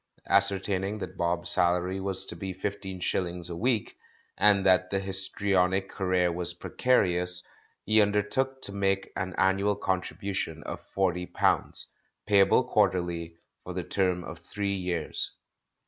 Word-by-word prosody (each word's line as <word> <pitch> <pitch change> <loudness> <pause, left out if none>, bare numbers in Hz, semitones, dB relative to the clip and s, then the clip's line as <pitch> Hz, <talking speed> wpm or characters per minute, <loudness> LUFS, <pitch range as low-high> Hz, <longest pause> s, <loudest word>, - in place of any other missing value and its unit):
Ascertaining 100 0 +2
that - - -6
Bob's 85 0 -1
salary 90 +2 +1
was 95 -1 +1
to - - -6
be 95 +2 -5
fifteen 95 0 -5
shillings 90 -1 -2
a - - -4
week, 115 +4 0 0.4
and 100 -2 +4
that 95 -1 +4
the 100 - 0
histrionic 95 0 +1
career 90 -2 +1
was 85 0 -3
precarious, 90 -5 +1 0.4
he 110 0 +5
undertook 105 +6 0
to - - -3
make 95 -1 0
an 95 -2 -3
annual 95 +2 +2
contribution 95 -3 -3
of 85 0 -6
forty 90 0 -1
pounds, - - 0 0.4
payable 100 -1 +5
quarterly, 85 -2 0 0.3
for 90 - -6
the 90 - -2
term 90 -1 0
of 80 0 -8
three 100 +4 -3
years. 90 -4 -2
95 Hz, 135 wpm, -28 LUFS, 90-100 Hz, 0.4 s, he